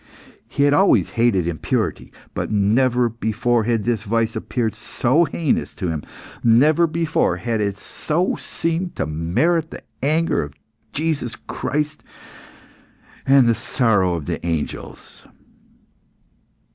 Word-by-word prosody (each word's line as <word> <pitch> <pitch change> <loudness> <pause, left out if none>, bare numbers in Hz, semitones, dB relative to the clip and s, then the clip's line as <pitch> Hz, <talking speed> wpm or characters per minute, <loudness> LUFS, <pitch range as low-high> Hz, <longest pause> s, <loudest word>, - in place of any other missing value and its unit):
He 140 - 0
had 145 0 +4
always 195 +6 +4
hated 115 -7 +2
impurity, 80 -3 -2 0.2
but - - -3
never 120 +4 +2
before 115 0 0
had 115 -2 +1
this 115 -2 0
vice 115 +1 0
appeared 115 -4 -2
so 140 +8 +1
heinous 155 0 -1
to 90 - -3
him; 80 -2 -2 0.4
never 150 +9 +5
before 165 0 0
had 115 -3 -2
it 100 -1 -1
so 165 - -1
seemed 165 +2 -3
to - - -1
merit 100 - 0
the - - -10 0.2
anger 155 +5 +1
of 75 -1 -7 0.4
Jesus 145 -6 -2
Christ 150 +2 -3 1.3
and 135 -1 +6
the 115 - +4
sorrow 100 -7 +1
of 80 -4 -5
the - - -4
angels. 85 -3 -5
120 Hz, 125 wpm, -21 LUFS, 105-150 Hz, 1.3 s, and